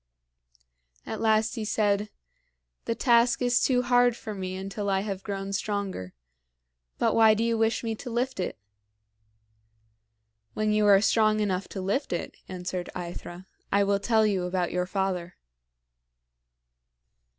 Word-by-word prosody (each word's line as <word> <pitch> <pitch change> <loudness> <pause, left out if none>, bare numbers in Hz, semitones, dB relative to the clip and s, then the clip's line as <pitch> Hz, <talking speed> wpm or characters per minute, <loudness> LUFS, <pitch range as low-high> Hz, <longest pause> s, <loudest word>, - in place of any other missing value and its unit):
At - - -5
last 220 0 +2
he 225 - -4
said, 210 -1 +1 0.8
"The 230 - -1
task 235 -1 +3
is 245 0 +2
too 250 -2 +2
hard 245 -1 +3
for 215 - -6
me 185 -2 -5
until 195 +2 -4
I 195 0 +1
have 195 -2 -4
grown 195 -1 -4
stronger. 200 - -3 0.8
But - - +2
why 220 -1 +6
do 225 - 0
you 230 0 +1
wish 225 +1 +1
me 225 -1 -1
to 245 +3 -7
lift 245 0 -2
it?" 180 - -3 2.0
"When 215 0 +1
you 210 0 +3
are 200 -1 +7
strong 215 0 +3
enough 195 -2 -1
to 195 - -6
lift 200 +6 -1
it," 175 - -4
answered 180 -1 -4
AEthra, 175 0 -7 0.3
"I 200 0 +4
will 200 0 +1
tell 220 +1 +3
you 195 -4 0
about 180 -1 -1
your 180 0 -1
father." 185 -2 -2
205 Hz, 145 wpm, -27 LUFS, 190-225 Hz, 2.0 s, are